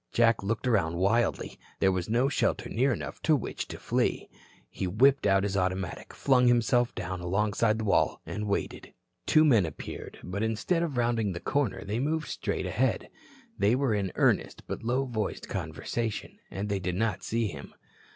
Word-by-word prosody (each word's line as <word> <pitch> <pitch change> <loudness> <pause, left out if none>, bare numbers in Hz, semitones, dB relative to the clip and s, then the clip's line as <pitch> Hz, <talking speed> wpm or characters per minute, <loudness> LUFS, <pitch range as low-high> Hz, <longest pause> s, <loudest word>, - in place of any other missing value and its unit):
Jack 115 -2 +3
looked 110 +5 -2
around 100 -9 +2
wildly. 110 +6 +1 0.2
There 95 - +4
was 95 +1 -2
no 120 +4 +3
shelter 140 - 0
near 130 +5 +2
enough - - -5
to 155 - +4
which 140 - -4
to - - -7
flee. - - -1 0.4
He 95 - -3
whipped 130 +6 +4
out 95 0 +4
his 100 -1 -1
automatic, 95 -1 -2
flung 125 -2 +3
himself 120 0 +3
down 90 0 -4
alongside 105 +4 +1
the 110 - -3
wall, 100 - +2
and 105 0 -4
waited. 100 - -3 0.3
Two 155 0 +5
men 115 -10 +5
appeared, 80 - -7
but 95 +3 -4
instead 110 +10 0
of 155 -7 -2
rounding 115 -4 +1
the 85 - -5
corner 140 +2 -1
they 105 +4 -2
moved 155 +4 -1
straight - - -2
ahead. - - 0 0.5
They 100 +4 +4
were 130 -3 +1
in 100 -3 -1
earnest, - - +1
but - - -5
low 125 +4 0
voiced 110 -5 -3
conversation. 115 -3 -4
They 100 0 -2
did 90 -1 -2
not 100 -1 0
see 115 +4 -1
him. 70 -5 -10
110 Hz, 175 wpm, -28 LUFS, 95-120 Hz, 0.5 s, Two